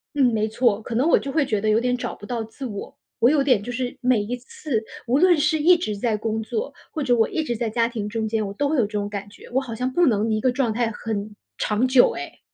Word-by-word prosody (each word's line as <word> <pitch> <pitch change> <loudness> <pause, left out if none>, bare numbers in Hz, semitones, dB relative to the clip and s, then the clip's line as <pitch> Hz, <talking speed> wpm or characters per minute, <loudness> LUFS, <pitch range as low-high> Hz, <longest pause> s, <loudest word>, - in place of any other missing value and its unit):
嗯， 280 - +4
没 215 0 +1
错。 220 -2 +1
可 230 - -6
能 265 +7 +3
我 - - +5
就 275 - -5
会 295 0 +1
觉 215 -5 0
得 215 - -1
有 215 +1 +4
点 250 +1 +1
找 250 - -4
不 205 - -12
到 235 -2 -2
自 225 +5 -8
我。 205 -4 -7 0.2
我 235 - +6
有 290 -2 +3
点 250 -7 +3
就 245 - -6
是， 245 0 -3
每 250 -3 +3
一 235 +4 -3
次 250 -1 -4 0.2
无 255 +4 +2
论 355 0 +5
是 305 +1 +2
一 345 +4 +6
直 215 -12 -3
在 220 +1 0
工 220 +1 -2
作， 445 - -3 0.2
或 315 - -3
者 250 -3 +3
我 225 -2 +3
一 315 - -2
直 240 - -2
在 230 0 -1
家 230 +1 +2
庭 225 -3 -4
中 220 0 -2
间， 220 0 -1
我 195 - -5
都 285 +6 0
会 310 - +1
有 245 - +4
这 210 - -15
种 205 -1 -2
感 205 0 -6
觉， - - -14
我 255 +2 +1
好 250 -4 -6
像 250 +3 -2
不 350 +4 +3
能 220 -2 +2
一 215 - +1
个 255 - +3
状 245 -2 0
态 230 0 0
很 210 -1 -5 0.2
长 215 +4 +1
久 255 -1 +5
诶。 - - -8
235 Hz, 305 characters per minute, -23 LUFS, 215-265 Hz, 0.2 s, 我